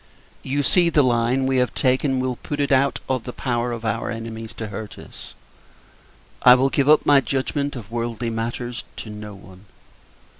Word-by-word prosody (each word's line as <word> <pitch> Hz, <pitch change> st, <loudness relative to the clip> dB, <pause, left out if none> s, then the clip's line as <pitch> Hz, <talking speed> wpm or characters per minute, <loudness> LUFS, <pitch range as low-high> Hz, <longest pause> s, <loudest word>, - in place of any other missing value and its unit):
You 140 Hz, +2 st, -1 dB
see, 175 Hz, +4 st, +4 dB
the 150 Hz, -3 st, +4 dB
line 125 Hz, +1 st, +1 dB
we 130 Hz, 0 st, +1 dB
have 125 Hz, -1 st, +1 dB
taken 130 Hz, +1 st, +1 dB
will 130 Hz, -1 st, -2 dB
put 145 Hz, -, -5 dB
it 140 Hz, -1 st, 0 dB
out 135 Hz, +1 st, +3 dB
of 130 Hz, -3 st, -1 dB
the 125 Hz, -, -6 dB
power 120 Hz, -1 st, -2 dB
of 115 Hz, -1 st, -5 dB
our 110 Hz, -, -1 dB
enemies 115 Hz, -1 st, -6 dB
to 110 Hz, -2 st, -5 dB
hurt 105 Hz, 0 st, -7 dB
us. -, -, -12 dB, 1.1 s
I 125 Hz, 0 st, +8 dB
will 135 Hz, +2 st, +2 dB
give 140 Hz, 0 st, +2 dB
up 155 Hz, -, +5 dB
my 145 Hz, -1 st, +6 dB
judgment 140 Hz, +2 st, -2 dB
of 115 Hz, -4 st, -9 dB
worldly 115 Hz, 0 st, -3 dB
matters 120 Hz, +2 st, -4 dB
to 110 Hz, -, -7 dB
no 105 Hz, -1 st, -8 dB
one. 95 Hz, -1 st, -15 dB
125 Hz, 185 wpm, -22 LUFS, 115-135 Hz, 1.1 s, I